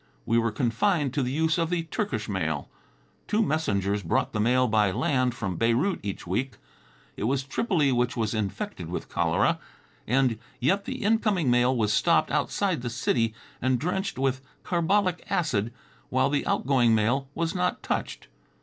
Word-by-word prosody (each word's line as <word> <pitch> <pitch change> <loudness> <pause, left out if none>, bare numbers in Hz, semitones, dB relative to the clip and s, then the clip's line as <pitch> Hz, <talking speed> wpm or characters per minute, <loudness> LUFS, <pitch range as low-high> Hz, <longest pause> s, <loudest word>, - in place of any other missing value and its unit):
We 115 +1 +3
were 115 -1 0
confined 135 - +1
to 145 - 0
the 125 -1 -1
use 160 +4 +1
of 165 -1 0
the 175 -1 0
Turkish 165 - -3
mail. 80 -8 -2 0.6
Two 215 +2 +2
messengers 105 - 0
brought 80 - 0
the 105 - -1
mail 125 +4 +3
by 105 -2 +3
land 125 +3 0
from 95 -7 -3
Beirut 120 +12 +1
each 100 -2 -5
week. 125 +10 -2 0.6
It - - -3
was 135 +3 +1
Tripoli 150 - +1
which 125 0 0
was 110 -2 0
infected 105 -3 -4
with - - -5
cholera, - - +1 0.5
and 125 -2 +2 0.2
yet 195 +10 +1
the 260 -3 -5
incoming 205 - +2
mail 125 +1 +3
was 105 -2 +1
stopped - - +3
outside 190 -9 0
the 120 - -3
city 115 -2 0 0.3
and 130 0 +2
drenched 180 - -2
with 135 0 0 0.2
carbolic 180 +1 +1
acid, 120 -10 0 0.4
while 130 +2 +2
the 145 - 0
outgoing 125 -4 +3
mail 125 +6 +1
was 165 0 -1
not 180 -1 -1
touched. - - -3
130 Hz, 165 wpm, -26 LUFS, 115-165 Hz, 0.6 s, We